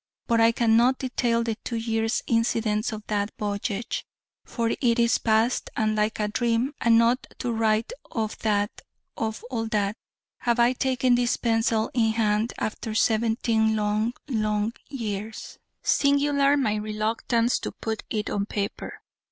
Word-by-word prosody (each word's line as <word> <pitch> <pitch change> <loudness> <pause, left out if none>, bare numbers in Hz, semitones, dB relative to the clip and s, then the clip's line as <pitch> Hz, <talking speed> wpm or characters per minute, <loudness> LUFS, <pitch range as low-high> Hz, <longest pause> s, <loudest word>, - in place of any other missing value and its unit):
But 230 -2 +2
I 225 0 +6
cannot 235 +2 +3
detail 240 -2 0
the 230 -1 -1
two 235 - -4
years' 225 0 -1
incidents 230 -1 +1
of 215 -1 -7
that 205 -1 -1
voyage: 205 +2 -3 0.4
for 230 -2 -2
it 235 -3 +3
is 235 -1 +3
past, 225 +2 +1
and 215 0 +1
like 215 +1 0
a 210 - +1
dream: 235 +5 0
and 230 -1 +5
not 235 +3 +2
to 245 - -2
write 225 - +1 0.2
of 220 -2 -2
that 205 -1 0 0.3
of 220 0 -3
all 225 -2 -2
that 210 -2 0 0.4
have 240 0 +1
I 240 +1 +5
taken 255 -1 +1
this 245 0 +2
pencil 225 -1 +1
in 225 -3 +2
hand 220 0 +1
after 215 +1 -4
seventeen 220 0 +2
long, 215 +2 0
long 215 -3 0 0.2
years. 220 -5 -5 0.2
Singular 280 0 +3
my 215 -6 +1
reluctance 220 +3 0
to - - -4
put 220 -1 -4
it 210 -1 -2
on 200 0 -1
paper. 205 -1 -4
225 Hz, 150 wpm, -25 LUFS, 215-235 Hz, 0.4 s, I